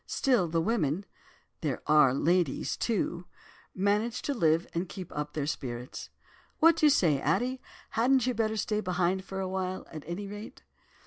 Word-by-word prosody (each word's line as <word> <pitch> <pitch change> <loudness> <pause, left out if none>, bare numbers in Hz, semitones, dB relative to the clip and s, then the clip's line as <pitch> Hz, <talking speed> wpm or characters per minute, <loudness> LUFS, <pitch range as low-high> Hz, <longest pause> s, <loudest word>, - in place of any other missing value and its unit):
Still, 245 -10 +2
the 165 0 0
women—there 165 - -3
are 150 -3 +6
ladies, 170 +2 +1
too—manage 205 +2 -2
to 285 - -1
live 165 - +2
and 170 +1 -2
keep 185 +2 -8
up 150 0 -3
their 150 -2 -2
spirits.' 125 -4 -5 0.5
"'What 330 +1 +5
do 310 - +5
you - - +7
say, 160 - +3
Addie, 255 +1 0 0.3
hadn't 250 +2 +3
you 255 - +1
better 220 -1 0
stay 210 +1 0
behind 185 0 0
for 190 0 -6
a 190 - -2
while, 185 0 -3
at 155 -3 -7
any 175 +4 -4
rate? 205 +2 -9
185 Hz, 155 wpm, -29 LUFS, 160-220 Hz, 0.5 s, you